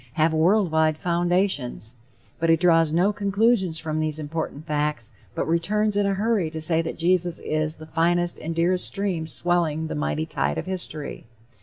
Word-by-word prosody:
have 160 +2 +2
world 180 +3 +3
wide 160 -1 +2
foundations;" 175 - 0 0.5
but 165 0 +1
he 165 - +7
draws 165 -2 +3
no 180 +6 +2
conclusions 200 -3 +1
from 155 -1 -3
these 155 -1 -1
important 155 -1 -5
facts, 150 -7 -2 0.2
but - - -2
returns 205 +6 +1
in 205 0 +2
a 195 - 0
hurry 205 -4 0
to 160 0 -6
say 160 +1 +3
that 165 - -5
Jesus 175 0 +1
is 155 0 -2
the 155 - -11
"finest 175 +2 +1
and 165 +1 -5
dearest 180 +2 +2
stream 185 -5 -2
swelling 165 -2 0
the - - -4
mighty 75 +1 -2
tide 70 0 -2
of - - -3
history." 175 -6 -4
165 Hz, 175 wpm, -24 LUFS, 155-180 Hz, 0.5 s, he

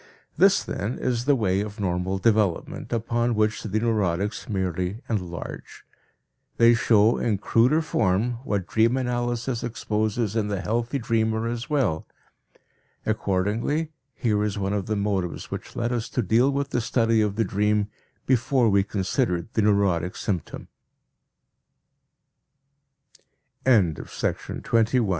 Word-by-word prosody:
This, 195 +4 +4
then, 105 +5 -3
is 120 -1 -1
the 145 0 +4
way 100 -5 +1
of 105 +1 -6
normal 95 0 -1
development, 105 -3 0
upon 115 +1 0
which 110 0 +1
the 110 0 -1
neurotics 105 -3 -1
merely 95 -1 -2
enlarge. 90 -6 -5 0.7
They 115 0 +6
show 115 -1 +3
in 110 -4 +1
cruder 125 +10 +3
form 115 -2 0
what 100 -9 -1
dream 115 +5 +2
analysis 120 -1 -2
exposes 110 -1 -1
in 110 -2 +1
the 100 -2 -2
healthy 115 +6 -1
dreamer 110 -2 0
as 120 +4 -4
well. 120 - 0 1.0
Accordingly 110 - 0 0.2
here 105 -3 +1
is 105 -1 -2
one 100 0 -1
of 100 -2 -2
the 110 - 0
motives 100 -4 -2
which - - -7
led 120 +1 -1
us 120 -1 -2
to 125 - -1
deal 115 +7 +3
with 140 0 -2
the 120 - 0
study 115 -1 +2
of 105 -2 0
the 115 +1 +1
dream 105 +1 +1 0.4
before 130 -1 +2
we 100 -1 +4
considered 95 -1 -1
the 110 - +2
neurotic 100 -4 +2
symptom. 95 -6 -4 3.0
TWENTY 100 - +3
SECOND - - -4
LECTURE 115 -1 +6 0.2
GENERAL 110 -5 0
110 Hz, 135 wpm, -25 LUFS, 100-120 Hz, 3.0 s, They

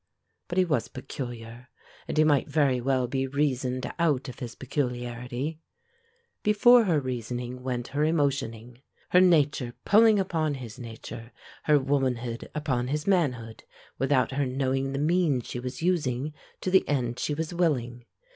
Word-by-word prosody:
But 175 - -4
he 185 - +5
was 150 -9 0
peculiar, 120 -2 -8 0.4
and - - -4
he 155 - +6
might 145 -4 +3
very 140 -4 +2
well 130 0 +1
be 135 +2 -1
reasoned 130 -2 -1
out 150 -6 +1
of 125 - -8
his 120 -2 -6
peculiarity. 125 +2 -3 0.8
Before 230 +3 +6
her 165 -6 +2
reasoning 125 -1 -4
went 125 -2 -3
her 145 +2 -2
emotioning: 135 -6 -1 0.3
her 180 - +6
nature 145 -8 +3
pulling 220 +1 +6
upon 160 -6 0
his 125 -2 -9
nature, 115 0 -9 0.3
her 150 -1 +5
womanhood 130 -4 -1
upon 130 -5 -1
his 150 +3 -2
manhood, 125 - 0 0.4
without 135 0 +2
her 135 0 0
knowing 135 +1 -1
the - - -2
means 150 -4 +1
she 125 - -5
was 125 +4 -6
using 150 -5 0 0.3
to 185 - -2
the 190 - +5
end 125 -4 -1
she 150 - -1
was 160 +2 -3
willing. 125 -9 -1
135 Hz, 150 wpm, -27 LUFS, 125-155 Hz, 0.8 s, he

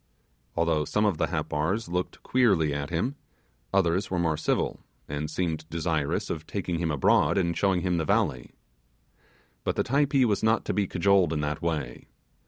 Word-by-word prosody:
Although 80 -2 +1
some 105 +6 +1
of 100 -7 +1
the - - +2
Happars 85 +10 -1
looked 90 +1 -3
queerly 95 - +3
at 70 0 -3
him, 120 - -1 0.5
others 95 0 +1
were 95 - -1
more 80 -2 +1
civil, 75 - -1 0.3
and 75 +1 -3
seemed 80 -2 -3
desirous 80 -3 -1
of 80 -1 -5
taking 90 -4 -3
him 85 -1 -1
abroad 75 +6 +3
and 85 -3 +1
showing 95 -3 +2
him 90 0 0
the 80 - 0
valley. 60 -4 0 1.1
But - - -1
the - - +1
Typee 140 0 +2
was 105 -4 +1
not 110 +1 +2
to - - -1
be 100 -2 +1
cajoled 95 -1 +3
in 75 - -1
that 75 0 -2
way. 75 -7 -3
85 Hz, 175 wpm, -27 LUFS, 75-100 Hz, 1.1 s, queerly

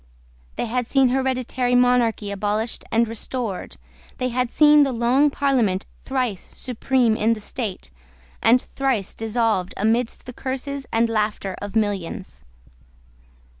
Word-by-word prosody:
They - - -2
had 245 +1 -2
seen 270 -1 +4
hereditary 255 -1 0
monarchy 245 -4 +2
abolished 210 +3 -2
and 230 +1 +3
restored. 225 -2 -5 0.4
They 255 - -1
had 250 0 -1
seen 300 -1 +6
the 275 -2 +3
Long 250 +5 +3
Parliament 250 -10 +1 0.2
thrice 250 -8 -3
supreme 250 -2 +1
in 220 +1 +2
the 225 - -5
state, 210 - -4 0.5
and 245 +2 +5
thrice 255 -7 -2
dissolved 220 -4 -1
amidst 225 +3 0
the 250 - -8
curses 270 +2 -4
and 230 +1 +3
laughter 210 -3 -1
of 205 +1 -6
millions. 195 - -2
235 Hz, 130 wpm, -22 LUFS, 215-255 Hz, 0.5 s, seen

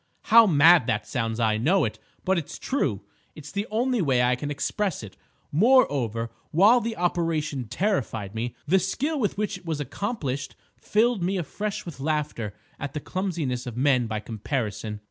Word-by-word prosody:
How 230 -1 +9
mad 160 - +6
that 105 -4 0
sounds! 115 -3 -2
I 110 -2 +2
know 175 - +3
it, - - -5 0.3
but 190 -1 +2
it's 155 - -8
true. 110 - -1 0.3
It's 150 -1 -10
the 200 +2 -3
only 240 +2 +1
way 130 -6 +2
I 125 0 +3
can 145 +4 -5
express 165 - -2
it. 100 - -10 0.4
Moreover, 145 - +3 0.2
while 210 +9 +5
the 230 0 -3
operation 165 -6 -1
terrified 115 - -2
me, 115 +2 -4
the 185 +6 +4
skill 280 - -1
with 210 -6 -1
which 210 -2 -2
it 180 - -24
was 160 -2 -2
accomplished 145 - -3 0.2
filled 225 0 +1
me 190 +3 0
afresh 200 +5 -4
with 165 -6 -8
laughter 145 -8 -2 0.2
at 145 0 -5
the - - -1
clumsiness 155 -9 -3
of 120 -1 -6
men 130 -3 +3
by 110 -1 -2
comparison. 110 -2 -4
150 Hz, 170 wpm, -25 LUFS, 125-195 Hz, 0.4 s, How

